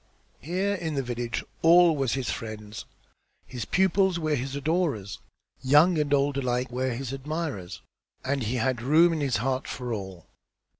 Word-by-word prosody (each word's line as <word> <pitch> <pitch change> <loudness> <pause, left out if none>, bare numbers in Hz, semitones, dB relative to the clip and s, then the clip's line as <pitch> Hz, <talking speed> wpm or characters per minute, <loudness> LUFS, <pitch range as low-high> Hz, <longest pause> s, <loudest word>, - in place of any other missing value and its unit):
Here 185 +5 -1
in 165 -6 -3
the 135 - -1
village 120 -1 -3 0.2
all 170 0 +6
was 135 -4 0
his 135 -2 -2
friends; 110 -2 -7 0.6
his 125 -2 -6
pupils 190 -1 +2
were 155 -2 -2
all - - +3
his 135 +1 -4
adorers, 145 - -1 0.4
young 150 +6 +5
and 145 -1 -1
old 140 0 +2
alike 125 -1 -1
were 130 +1 -1
his 135 +1 -5
admirers, 140 - -5 0.4
and 135 +1 0
he 115 +2 -2
had 125 0 0
room 160 +7 +4
in 155 - -2
his 135 -5 +1
heart 130 +3 -2
for 125 -2 -4
all. 95 -5 -7
135 Hz, 165 wpm, -26 LUFS, 120-160 Hz, 0.6 s, all